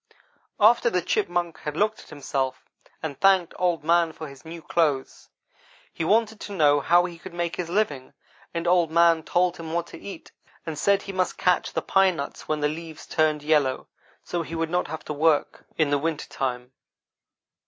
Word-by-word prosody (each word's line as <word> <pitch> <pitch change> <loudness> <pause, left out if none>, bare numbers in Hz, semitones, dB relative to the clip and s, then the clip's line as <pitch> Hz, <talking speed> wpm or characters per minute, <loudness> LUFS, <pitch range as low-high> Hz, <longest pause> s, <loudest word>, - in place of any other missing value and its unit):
"After 235 +3 +5
the 180 -5 0
Chipmunk 175 -1 -1
had 150 +1 -5
looked 215 +2 +1
at - - -15
himself, 135 -2 -3 0.4
and 145 -4 -5
thanked 190 -3 +4
Old 175 -4 +1
man 165 0 +3
for 155 0 -8
his 140 -2 -13
new 165 +1 -8
clothes, 150 -4 -1 0.6
he - - -3
wanted 220 +4 +2
to 205 - -7
know 145 -5 +4
how 175 +4 +4
he 170 -2 -8
could 180 0 -10
make 175 -1 -2
his 175 -2 -4
living, 170 -9 -1 0.4
and 170 0 -3
Old 175 -2 +3
man 170 0 +4
told 175 +2 +1
him 160 -1 -7
what 170 0 0
to - - -11
eat, 195 -4 -9 0.3
and 160 -3 -5
said 200 +2 +2
he 195 - -6
must 185 -1 -1
cache 180 -1 +2
the - - -3
pine 195 -2 +3
nuts 140 -2 -6
when 155 -1 -1
the 150 - +3
leaves 160 +1 -7
turned 155 -2 +1
yellow, 150 -4 +1 0.4
so 175 - -3
he 165 0 -6
would 165 0 -2
not 180 0 0
have 160 - -7
to 150 - -4
work 150 0 +1
in 155 -3 +2
the 145 - +2
winter 160 0 -2
time. 125 -1 -3
165 Hz, 195 wpm, -25 LUFS, 150-180 Hz, 0.6 s, After